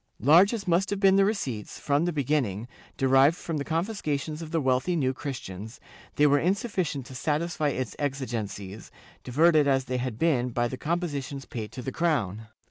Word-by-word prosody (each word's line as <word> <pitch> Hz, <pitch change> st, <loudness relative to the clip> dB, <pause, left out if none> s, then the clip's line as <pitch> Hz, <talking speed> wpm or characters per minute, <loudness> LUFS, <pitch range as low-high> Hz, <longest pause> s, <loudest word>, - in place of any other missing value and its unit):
Large 170 Hz, -, +6 dB
as 200 Hz, -4 st, -6 dB
must 180 Hz, +3 st, +2 dB
have 205 Hz, -, -2 dB
been 195 Hz, -1 st, +5 dB
the 195 Hz, -, +5 dB
receipts, 135 Hz, -, -3 dB
from 145 Hz, +3 st, +1 dB
the 175 Hz, -, 0 dB
beginning, 130 Hz, -, -1 dB, 0.3 s
derived 135 Hz, +4 st, +4 dB
from 165 Hz, -3 st, -4 dB
the 140 Hz, -, -2 dB
confiscations 160 Hz, -3 st, -2 dB
of 160 Hz, -, -7 dB
the 165 Hz, -, 0 dB
wealthy 130 Hz, +5 st, +1 dB
New 130 Hz, -5 st, +1 dB
Christians, 110 Hz, -, -7 dB, 0.4 s
they 150 Hz, -, +4 dB
were 145 Hz, 0 st, +5 dB
insufficient 180 Hz, -, -1 dB
to 130 Hz, -, -11 dB
satisfy 155 Hz, +3 st, -1 dB
its 130 Hz, -5 st, -3 dB
exigencies, 115 Hz, -8 st, -4 dB, 0.3 s
diverted 155 Hz, +3 st, +4 dB
as 135 Hz, -1 st, +2 dB
they 130 Hz, 0 st, -2 dB
had 125 Hz, -3 st, -3 dB
been 130 Hz, -6 st, +1 dB
by 120 Hz, 0 st, 0 dB
the 130 Hz, -, -5 dB
compositions 145 Hz, -3 st, -3 dB
paid 110 Hz, -3 st, -6 dB
to 125 Hz, -, -7 dB
the 130 Hz, -, -3 dB
crown. 115 Hz, -, -1 dB
145 Hz, 180 wpm, -27 LUFS, 125-165 Hz, 0.4 s, Large